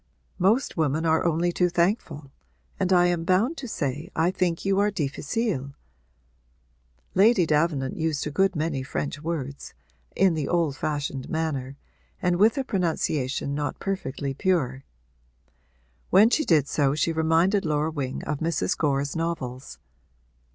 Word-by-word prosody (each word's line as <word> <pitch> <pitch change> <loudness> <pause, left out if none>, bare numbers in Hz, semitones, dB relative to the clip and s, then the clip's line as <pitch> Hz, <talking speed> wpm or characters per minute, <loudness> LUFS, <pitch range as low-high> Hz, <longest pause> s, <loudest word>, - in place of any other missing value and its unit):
'Most 210 +8 +2
women 155 +1 +1
are 160 0 +2
only 170 +1 +1
too 180 +1 +1
thankful 170 - -1 0.5
and 190 -1 0
I 175 -1 +5
am 175 -2 +1
bound 195 - +2
to 255 - -6
say 150 - -3
I 165 +3 +2
think 180 -3 -1
you 195 0 +2
are 205 +1 +3
difficile.' 145 - -2 1.4
Lady 200 -2 +5
Davenant 150 -3 0
used 160 -3 -1
a 150 - -3
good 190 +5 +2
many 155 -3 -1
French 145 +3 -4
words, 145 -4 -5 0.4
in 190 -2 +4
the 155 -3 -2
old 165 -5 +1
fashioned 140 -2 -3
manner 140 -4 -3 0.4
and 180 -1 +1
with 220 +8 +4
a 270 - 0
pronunciation 155 - -1
not 145 0 -3
perfectly 140 -8 -3
pure: 135 -5 0 1.2
when 210 +5 +6
she 310 - +2
did 150 -5 +3
so 140 -1 +1
she 165 +2 0
reminded 165 +5 +2
Laura 155 0 0
Wing 135 -4 -4
of 150 -1 -3
Mrs. 160 - 0
Gore's 140 -2 0
novels. 140 -6 -4
160 Hz, 145 wpm, -25 LUFS, 140-180 Hz, 1.4 s, when